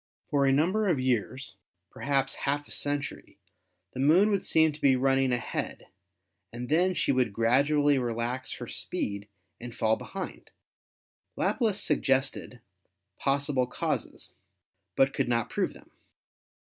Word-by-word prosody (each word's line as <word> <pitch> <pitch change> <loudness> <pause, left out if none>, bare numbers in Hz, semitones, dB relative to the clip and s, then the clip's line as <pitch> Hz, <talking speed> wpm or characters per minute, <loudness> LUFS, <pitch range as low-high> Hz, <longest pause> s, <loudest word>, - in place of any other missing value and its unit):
For 140 -1 +3
a - - +4
number 185 +10 +2
of 165 -8 +2
years, 130 -3 -2 0.3
perhaps 135 -1 -1
half 145 +1 -2
a - - -9
century, 145 0 -4 0.6
the 130 - -7
Moon 170 +10 +5
would 200 - 0
seem 160 -1 +3
to 150 - -12
be 135 -2 +5
running 135 0 +2
ahead 120 -1 -3 0.6
and 120 +2 -6
then 180 +4 +2
she - - +1
would 125 -4 +1
gradually 140 +6 +3
relax 120 +1 -3
her - - -7
speed 100 0 -3 0.3
and 120 0 -8
fall 110 0 +2
behind. 195 -1 -7 0.9
Laplace 220 -5 0
suggested 135 -3 0 0.6
possible 140 -2 +1
causes, - - -4 0.6
but 135 0 +3
could - - -1
not 115 -2 0
prove 200 - -1
them. - - -17
135 Hz, 135 wpm, -28 LUFS, 125-150 Hz, 0.9 s, Moon